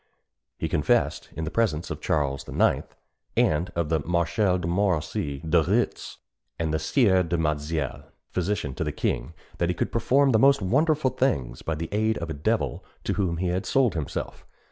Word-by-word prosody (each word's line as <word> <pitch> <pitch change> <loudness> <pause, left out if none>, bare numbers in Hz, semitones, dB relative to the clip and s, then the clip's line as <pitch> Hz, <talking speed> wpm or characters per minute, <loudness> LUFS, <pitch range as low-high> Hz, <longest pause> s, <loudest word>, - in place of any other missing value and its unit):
He - - -2
confessed, - - +1
in 80 - -3
the 80 - -3
presence 95 -9 0
of - - -5
Charles 70 -2 -1
IX., - - +2 0.5
and 80 +4 +2
of 85 -3 -1
the 80 -1 +2
Marshals 90 +4 +1
de 85 - -2
Montmorency, 85 -6 -1
De 85 +1 +4
Retz, 75 - -1 0.4
and 80 -2 -1
the 80 - +1
Sieur 95 - +3
du 85 -1 -1
Mazille, 75 -2 -2 0.3
physician 90 -6 -1
to - - -3
the - - -2
king, 80 - -2 0.2
that 85 - +1
he 90 - 0
could - - -2
perform 135 +4 +3
the 110 - +4
most 140 +3 +5
wonderful 140 - +2
things 65 - -1
by 80 - -2
the 80 +1 -4
aid 110 +2 +1
of 85 -1 -4
a - - -2
devil 70 0 -1 0.2
to - - -1
whom 90 -5 0
he 90 +1 -1
had 95 +3 -2
sold 130 -4 +3
himself. 80 -4 -4
85 Hz, 185 wpm, -26 LUFS, 80-105 Hz, 0.5 s, most